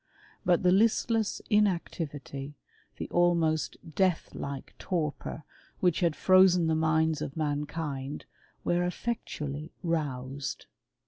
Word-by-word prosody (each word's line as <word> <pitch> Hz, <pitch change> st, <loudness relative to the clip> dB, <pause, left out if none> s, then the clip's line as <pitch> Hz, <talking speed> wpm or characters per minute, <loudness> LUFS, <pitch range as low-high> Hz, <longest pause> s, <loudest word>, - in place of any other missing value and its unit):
But 180 Hz, -3 st, +3 dB
the 180 Hz, -, +5 dB
listless 220 Hz, +2 st, +2 dB
inactivity, 150 Hz, -, -1 dB, 0.4 s
the -, -, -4 dB
^niost 170 Hz, -3 st, +2 dB, 0.2 s
deathlike 160 Hz, -6 st, -1 dB
torpor 155 Hz, -4 st, -3 dB, 0.4 s
which 180 Hz, -3 st, +2 dB
had 170 Hz, -4 st, +2 dB
frozen 185 Hz, -2 st, +5 dB
the 160 Hz, -, +2 dB
minds 160 Hz, 0 st, +2 dB
of 135 Hz, -, -5 dB
Mankind, 145 Hz, -2 st, -3 dB, 0.4 s
were 175 Hz, 0 st, +2 dB
effectually 155 Hz, -7 st, -4 dB
roused. 140 Hz, -5 st, -2 dB
160 Hz, 100 wpm, -29 LUFS, 145-180 Hz, 0.4 s, the